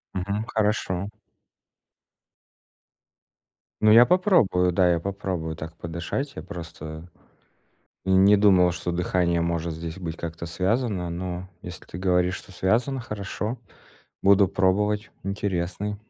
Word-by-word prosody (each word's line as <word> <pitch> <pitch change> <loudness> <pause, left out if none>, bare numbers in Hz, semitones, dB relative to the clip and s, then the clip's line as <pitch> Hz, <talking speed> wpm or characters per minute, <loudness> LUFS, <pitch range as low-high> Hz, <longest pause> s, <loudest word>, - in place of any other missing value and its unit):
Мгм. 100 +4 -2
Хорошо. 105 -4 -1 2.7
Ну, 110 - +6
я 115 +3 +9
попробую, 175 - +3
да, 90 0 +3
я 85 -1 +2
попробую 90 -3 -4
так 80 +1 -8
подышать. 85 - -4
Я - - -7
просто 80 -2 -8 1.0
и 95 - -2
не 95 +2 +6
думал, 95 -3 +5
что 85 0 -3
дыхание 85 -1 +1
может 85 -1 -1
здесь 80 +2 -6
быть 85 -3 -5
как-то 85 0 -6
связано, 95 +1 -1
но 90 +1 -5
если 90 -2 -9
ты 85 - -9
говоришь, 90 -1 +1
что - - -12
связано, 120 +9 0
хорошо. 105 +1 -4 0.6
Буду 100 0 +5
пробовать. 105 +3 +1
Интересный. 100 +1 -2
95 Hz, 120 wpm, -25 LUFS, 85-105 Hz, 2.7 s, я